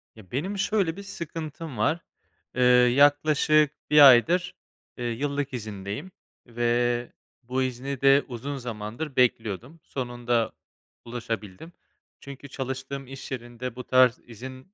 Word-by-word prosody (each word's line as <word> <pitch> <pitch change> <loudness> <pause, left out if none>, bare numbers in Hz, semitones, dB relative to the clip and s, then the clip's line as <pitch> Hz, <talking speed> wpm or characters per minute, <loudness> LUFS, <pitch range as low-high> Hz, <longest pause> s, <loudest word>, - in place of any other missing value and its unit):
Ya, 105 -5 -16
benim 185 +11 -2
şöyle 195 -4 +1
bir 200 - -7
sıkıntım 165 - -7
var. 155 +11 +1 0.6
Eee, 125 - +2
yaklaşık 145 +4 +5 0.2
1 150 -2 +10
aydır, 175 +9 +4 0.4
eee, 120 - -4
yıllık 140 +4 -2
izindeyim 105 - -6 0.4
ve 120 +1 0 0.3
bu 130 +2 -1
izni 130 +1 -4
de 135 +1 +6
uzun 135 +3 -5
zamandır 120 +4 -6
bekliyordum. 120 - 0
Sonunda 120 -3 -1 0.5
ulaşabildim. 115 - -6 0.5
Çünkü 140 0 -10
çalıştığım 135 0 -5
iş 135 +1 -9
yerinde 120 -1 -6
bu 125 - -6
tarz 130 -1 +4
izin, 130 - -10
130 Hz, 120 wpm, -26 LUFS, 120-145 Hz, 0.6 s, 1